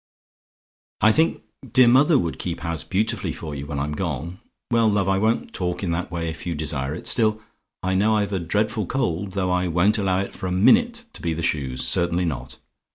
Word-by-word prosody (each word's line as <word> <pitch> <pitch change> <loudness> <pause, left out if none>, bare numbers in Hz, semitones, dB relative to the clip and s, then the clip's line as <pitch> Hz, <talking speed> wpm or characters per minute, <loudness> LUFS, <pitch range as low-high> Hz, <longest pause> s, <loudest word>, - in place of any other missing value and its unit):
"I 110 - +6
think 160 +8 +1 0.3
dear 130 -1 +6
mother 140 +6 +5
would 85 -8 -2
keep 85 -2 -4
house 85 -3 -2
beautifully 105 +4 -1
for 75 -3 -7
you 70 0 -6
when 70 - -4
I'm 70 +2 -2
gone. 85 +1 -4 0.3
Well, 115 -1 +4
love, 100 -2 +1
I 95 0 +2
won't 110 +3 0
talk 90 0 -2
in 90 - -1
that 85 +1 -2
way 85 -1 -3
if 80 +2 -6
you 85 - -2
desire 75 -2 -2
it. - - -9
Still, 110 -2 +2 0.4
I 95 +1 0
know 105 +3 +3
I've 100 -1 -1
a 95 - 0
dreadful 105 +3 -1
cold; 95 -6 -2
though 95 -2 0
I 90 0 +1
won't 90 +6 +2
allow 95 -2 +1
it 100 - -6
for 95 - -5
a - - -2
minute 235 - +3
to - - -7
be 85 -2 -1
the 85 - -4
shoes 65 -6 0
certainly 85 +1 +1
not. 80 -5 -4
90 Hz, 215 wpm, -23 LUFS, 85-105 Hz, 0.4 s, I